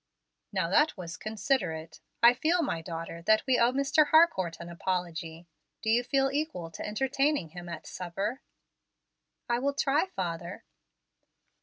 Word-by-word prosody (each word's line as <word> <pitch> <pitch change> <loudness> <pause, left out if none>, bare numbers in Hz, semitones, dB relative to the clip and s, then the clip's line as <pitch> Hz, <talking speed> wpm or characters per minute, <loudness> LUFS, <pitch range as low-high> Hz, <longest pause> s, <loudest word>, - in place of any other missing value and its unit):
"Now - - 0
that 300 +1 +3
was 170 -2 -6
considerate. 190 - -2 0.2
I 235 +1 +9
feel, 325 +7 +1
my 170 - -2
daughter, 165 0 -6
that 215 +5 +3
we 260 -2 +3
owe 235 +1 +5
Mr. 280 +3 +3
Harcourt 290 - +4
an 170 - -8
apology. 170 -2 -4 0.4
Do 220 - +1
you 240 +2 +3
feel 270 +2 +1
equal 285 - -3
to - - -7
entertaining 270 - 0
him 175 +1 -9
at 170 -2 -7
supper?" 195 +8 -4 1.1
"I 240 -1 +1
will 280 +2 0
try, 285 +5 +2
father." 175 - -5
215 Hz, 145 wpm, -29 LUFS, 170-275 Hz, 1.1 s, I